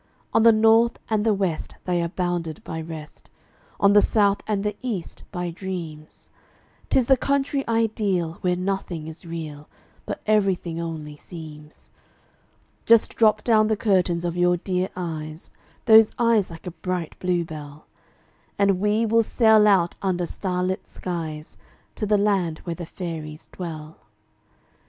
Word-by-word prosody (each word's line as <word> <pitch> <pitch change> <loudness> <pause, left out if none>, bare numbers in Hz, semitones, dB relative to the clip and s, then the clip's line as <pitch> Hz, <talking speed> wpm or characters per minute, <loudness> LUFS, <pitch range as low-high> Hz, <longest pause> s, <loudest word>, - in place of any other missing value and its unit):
On - - +4
the 230 +1 +8
North 225 +2 +4
and 215 -1 +2
the 225 - +3
West 190 -6 -2
they 180 -1 +1
are 170 - 0
bounded 175 0 -3
by 160 -4 -5
rest, 160 -2 -9 0.5
On 200 0 +5
the 205 - +7
South 205 -2 +2
and 205 -2 0
the 210 0 -2
East, 225 -9 -5
by 175 -3 -3
dreams; 165 -4 -7 0.6
'Tis 260 - +3
the 265 - +5
country 280 +1 0
ideal, 210 -7 0
where 180 -1 +1
nothing 180 -3 -3
is 160 +2 -10
real, 155 -3 -7 0.4
But - - -4
everything 190 -6 +1
only 155 -3 -6
seems. 150 -2 -12 1.0
Just 230 -1 +5
drop 215 -2 +3
down 215 -2 +4
the 220 -1 +1
curtains 180 -5 +1
of 170 -1 -2
your 175 0 +3
dear 185 +1 -1
eyes 160 -2 -6 0.3
Those 220 -1 +7
eyes 230 -4 +3
like 165 -1 -11
a 180 - -4
bright 180 -1 -4
bluebell, 160 -5 -3 0.7
And 200 -2 +3
we 210 +3 +2
will 230 +1 +4
sail 220 -1 +4
out 185 -4 +3
under 180 -2 0
starlit 185 +1 -2
skies, 160 -4 -6 0.4
To 210 - -3
the 210 0 +3
land 195 -6 +1
where 170 - -3
the 165 0 -7
fairies 160 -4 -7
dwell. 160 -3 -7
180 Hz, 145 wpm, -24 LUFS, 165-210 Hz, 1.0 s, the